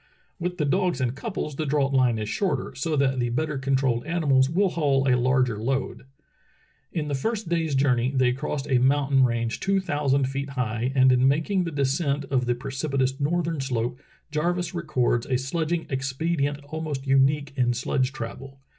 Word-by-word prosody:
With 180 Hz, +1 st, -3 dB
the 150 Hz, -, 0 dB
dogs 180 Hz, 0 st, +1 dB
in 125 Hz, -2 st, 0 dB
couples 150 Hz, -, -5 dB
the 155 Hz, -, -1 dB
draught 140 Hz, -1 st, +1 dB
line 125 Hz, -4 st, +3 dB
is 105 Hz, -1 st, -3 dB
shorter, 155 Hz, -, -1 dB
so 145 Hz, +5 st, -2 dB
that 135 Hz, -2 st, +1 dB
the 120 Hz, -1 st, 0 dB
better 145 Hz, +3 st, -1 dB
controlled 130 Hz, -3 st, +1 dB
animals 140 Hz, -6 st, +2 dB
will 190 Hz, +5 st, +2 dB
haul 140 Hz, -5 st, +1 dB
a 130 Hz, -, +4 dB
larger 125 Hz, -3 st, +1 dB
load. 130 Hz, +2 st, -2 dB, 0.9 s
In 155 Hz, -3 st, -2 dB
the 145 Hz, -, -2 dB
first 210 Hz, -, -2 dB
day's 165 Hz, -4 st, 0 dB
journey 130 Hz, -3 st, +2 dB
they 130 Hz, -2 st, +2 dB
crossed 140 Hz, +1 st, -3 dB
a 130 Hz, -2 st, +3 dB
mountain 135 Hz, +1 st, +3 dB
range 115 Hz, -1 st, 0 dB
two 195 Hz, 0 st, +1 dB
thousand 145 Hz, -6 st, 0 dB
feet 140 Hz, +1 st, -4 dB
high, 125 Hz, -2 st, -2 dB
and 130 Hz, -1 st, +6 dB
in 125 Hz, +1 st, +4 dB
making 160 Hz, +7 st, +1 dB
the 165 Hz, -, -3 dB
de 140 Hz, -2 st, 0 dB
scent 140 Hz, 0 st, 0 dB
of 125 Hz, -2 st, +1 dB
the 120 Hz, -, +2 dB
precipitous 135 Hz, +1 st, -2 dB
northern 165 Hz, +1 st, 0 dB
slope 125 Hz, 0 st, -2 dB, 0.3 s
Jarvis 175 Hz, +4 st, -1 dB
records 140 Hz, -8 st, 0 dB
a 130 Hz, -2 st, +1 dB
sledging 160 Hz, +5 st, -2 dB
expedient 140 Hz, +2 st, -1 dB
almost 155 Hz, -3 st, -4 dB
unique 140 Hz, +1 st, +2 dB
in 125 Hz, -2 st, +2 dB
sledge 130 Hz, +1 st, 0 dB
travel. 135 Hz, +1 st, -8 dB
135 Hz, 180 wpm, -25 LUFS, 130-155 Hz, 0.9 s, and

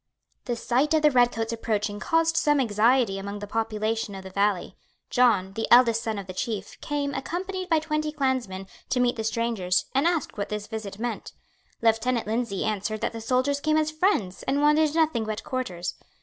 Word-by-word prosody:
The 240 Hz, -, -1 dB
sight 260 Hz, +7 st, +1 dB
of 310 Hz, -, +2 dB
the 300 Hz, -, +6 dB
red 245 Hz, -2 st, +4 dB
coats 225 Hz, 0 st, -3 dB
approaching 210 Hz, -2 st, -2 dB
caused 325 Hz, +5 st, +2 dB
some 295 Hz, -2 st, +3 dB
anxiety 225 Hz, -2 st, +2 dB
among 200 Hz, +1 st, -5 dB
the 205 Hz, -, -6 dB
population 220 Hz, -1 st, -2 dB
of 190 Hz, -, -8 dB
the 190 Hz, -, -9 dB
valley. 200 Hz, -1 st, 0 dB, 0.4 s
John, 215 Hz, -7 st, +3 dB
the 225 Hz, +2 st, -2 dB
eldest 235 Hz, -2 st, +6 dB
son 220 Hz, -2 st, -3 dB
of 200 Hz, -, -5 dB
the 185 Hz, -, -7 dB
Chief, 210 Hz, 0 st, -4 dB
came, 285 Hz, -1 st, -2 dB
accompanied 370 Hz, +6 st, -4 dB
by 325 Hz, -, +4 dB
twenty 305 Hz, 0 st, -1 dB
clansmen, 260 Hz, -10 st, -1 dB, 0.2 s
to 255 Hz, -, +1 dB
meet 245 Hz, -1 st, +2 dB
the 220 Hz, -, -3 dB
strangers, 220 Hz, -5 st, 0 dB
and 275 Hz, +5 st, +3 dB
asked 335 Hz, -10 st, -1 dB
what 200 Hz, -, -2 dB
this 210 Hz, -1 st, -4 dB
visit 210 Hz, -3 st, -6 dB
meant. 235 Hz, +1 st, -4 dB, 0.5 s
Lieutenant 230 Hz, +1 st, +2 dB
Lindsay 220 Hz, -3 st, -1 dB
answered 215 Hz, 0 st, -2 dB
that -, -, -1 dB
the 225 Hz, -, -6 dB
soldiers 255 Hz, +5 st, +1 dB
came 310 Hz, +1 st, +1 dB
as 310 Hz, 0 st, +1 dB
friends, 310 Hz, -, 0 dB
and 275 Hz, +2 st, +1 dB
wanted 300 Hz, +1 st, +3 dB
nothing 315 Hz, -8 st, +2 dB
but 215 Hz, 0 st, -4 dB
quarters. 185 Hz, -9 st, -3 dB
230 Hz, 190 wpm, -26 LUFS, 210-285 Hz, 0.5 s, the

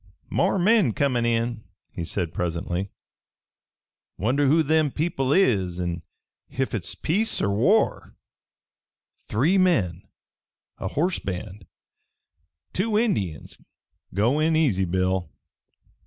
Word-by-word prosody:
"More -, -, +2 dB
men 195 Hz, -, +3 dB
comin' 125 Hz, -3 st, +1 dB
in," 115 Hz, -1 st, -1 dB, 0.4 s
said 85 Hz, 0 st, -2 dB
he -, -, -24 dB
presently. 90 Hz, +2 st, -2 dB, 1.3 s
"Wonder 135 Hz, +8 st, +1 dB
who 160 Hz, +4 st, +4 dB
them 155 Hz, 0 st, +2 dB
people 140 Hz, -3 st, -1 dB
is, 95 Hz, -, +2 dB
an' 85 Hz, -2 st, -3 dB, 0.5 s
ef 135 Hz, +1 st, -2 dB
hit's 100 Hz, -7 st, -4 dB
peace 205 Hz, +8 st, 0 dB
er 100 Hz, -, +1 dB
war." 140 Hz, -, +1 dB, 1.1 s
"Three 155 Hz, -, +2 dB
men. 100 Hz, -, +2 dB, 0.8 s
A -, -, -3 dB
horse 175 Hz, +5 st, 0 dB
band. 95 Hz, 0 st, -6 dB, 1.1 s
Two 210 Hz, +3 st, 0 dB
Indians. 105 Hz, -, -1 dB, 0.5 s
Go 115 Hz, +10 st, +1 dB
in 160 Hz, +1 st, +2 dB
easy, 120 Hz, -13 st, +2 dB
Bill." 95 Hz, -1 st, 0 dB
120 Hz, 110 wpm, -24 LUFS, -, 1.3 s, who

